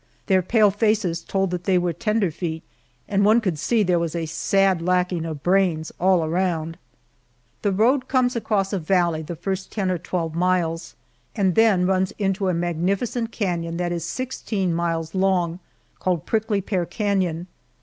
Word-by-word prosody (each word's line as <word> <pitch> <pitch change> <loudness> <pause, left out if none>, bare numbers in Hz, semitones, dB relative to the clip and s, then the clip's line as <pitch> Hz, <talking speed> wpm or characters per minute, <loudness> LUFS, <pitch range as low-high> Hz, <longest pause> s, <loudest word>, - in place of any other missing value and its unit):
Their 190 -2 +3
pale 210 +2 +3
faces 205 -5 +1
told 195 +1 -1
that 180 0 -4
they 190 -2 +3
were 175 -1 0
"tenderfeet," 175 -7 -1 0.4
and 200 -1 +1
one 215 +3 +5
could 185 -9 -2
see 225 +6 +2
there 180 -2 +2
was 170 -1 -2
a 165 -1 -2
sad 190 +3 +1
lacking 180 -1 0
of 155 -4 -6
brains 175 -4 +1
all 185 -2 +3
around. 165 -1 -1 0.8
The 205 - +1
road 245 +7 +2
comes 255 -2 +2
across 205 -4 0
a 195 - 0
valley 170 -1 +1
the 165 +2 -6
first 190 +3 -4
ten 195 -4 -1
or 180 - -1
twelve 165 -2 -3
miles, 170 -1 0 0.4
and 190 -3 +2
then 205 -3 +4
runs 190 0 +1
into 195 -1 0
a - - +1
magnificent 190 +8 -1
canon 170 -6 -2
that 175 0 -1
is 170 -2 -2
sixteen 205 -4 -2
miles 165 -1 -2
long, 185 -3 +1 0.4
called 180 -5 -1
Prickly 215 -2 0
Pear 180 -3 -2
Canon. 185 -5 -1
185 Hz, 165 wpm, -23 LUFS, 170-200 Hz, 0.8 s, one